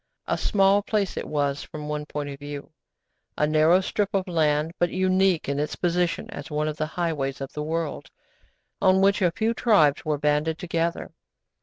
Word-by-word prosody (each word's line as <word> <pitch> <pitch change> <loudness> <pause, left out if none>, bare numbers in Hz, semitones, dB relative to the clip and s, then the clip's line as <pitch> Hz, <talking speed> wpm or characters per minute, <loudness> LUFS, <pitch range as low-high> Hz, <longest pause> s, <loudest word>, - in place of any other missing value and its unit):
A - - 0
small 195 -1 +3
place 205 -2 -1
it - - -4
was 145 -2 -1
from 150 -1 -8
one 150 0 -4
point 145 -1 -4
of 140 -1 -8
view! 145 -1 -8 0.7
A 150 - +3
narrow 155 +4 +4
strip 205 +2 -1
of 190 -1 0
land, 155 -2 +1
but 175 - +2
unique 185 -1 +2
in 140 +1 -1
its 150 - -2
position 175 -1 0
as - - -8
one 150 0 -1
of 155 0 -3
the 155 - -1
highways 150 -6 -1
of 135 0 -6
the 150 - -4
world, 160 0 -3 0.7
on 190 0 +4
which 200 +1 +3
a 180 - +4
few 220 +6 0
tribes 195 - +3
were 155 -1 0
banded 150 +2 +1
together. 170 -1 -2
160 Hz, 185 wpm, -25 LUFS, 150-185 Hz, 0.7 s, narrow